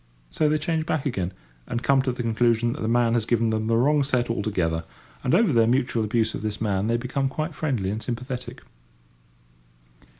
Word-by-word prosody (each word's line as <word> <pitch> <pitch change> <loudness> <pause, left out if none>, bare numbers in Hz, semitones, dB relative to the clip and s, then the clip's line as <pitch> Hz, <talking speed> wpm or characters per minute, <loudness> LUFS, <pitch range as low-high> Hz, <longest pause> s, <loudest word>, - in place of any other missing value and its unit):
So 155 - +2
they 155 - +2
change 160 +1 -2
back 150 - -1
again, 95 -10 -1 0.4
and 120 - -3
come 135 -1 +4
to 130 -1 -1
the 120 0 -4
conclusion 115 0 +2
that - - -7
the 110 - -1
man 115 0 +3
has 115 -2 0
given 115 -1 +2
them 110 0 -1
the 115 0 +2
wrong 145 +5 +3
set 130 -4 +1
altogether; 90 -7 -1 0.4
and 125 - +2
over 215 -9 +3
their 115 -1 +4
mutual 120 -2 +1
abuse 110 0 0
of - - -5
this 105 -1 -3
man 100 -2 0
they 115 +1 +2
become 135 +3 -1
quite 155 +4 -3
friendly 125 -12 -1
and 110 +2 -4
sympathetic. 125 +2 -5
120 Hz, 200 wpm, -25 LUFS, 110-135 Hz, 0.4 s, come